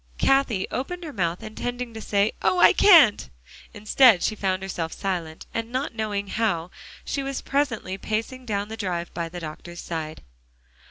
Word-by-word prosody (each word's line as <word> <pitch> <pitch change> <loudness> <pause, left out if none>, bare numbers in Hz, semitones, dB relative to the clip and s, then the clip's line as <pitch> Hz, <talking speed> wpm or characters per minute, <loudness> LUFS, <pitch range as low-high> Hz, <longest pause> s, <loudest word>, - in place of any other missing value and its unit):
Cathie 270 -8 +2
opened 355 +8 -4
her 310 -3 -7
mouth, 175 0 -2
intending 245 +2 -5
to 220 - -7
say, 205 0 +1
"Oh! 370 - +2
I - - +7
can't" 325 - +6 0.4
instead, 215 -1 +4
she - - +1
found 190 -2 -1
herself 170 -4 -4
silent, 175 -5 -4
and 230 +1 -3
not 260 +1 -2
knowing 210 -2 -2
how, 190 -7 -1 0.3
she 280 - -2
was 275 -1 -4
presently 240 -9 -1
pacing 230 +5 -4
down 205 -1 -2
the 220 - -5
drive 175 -5 -3
by 170 -1 -3
the 175 +1 -7
doctor's 170 +2 -8
side. 160 -2 -5
210 Hz, 165 wpm, -24 LUFS, 180-245 Hz, 0.4 s, I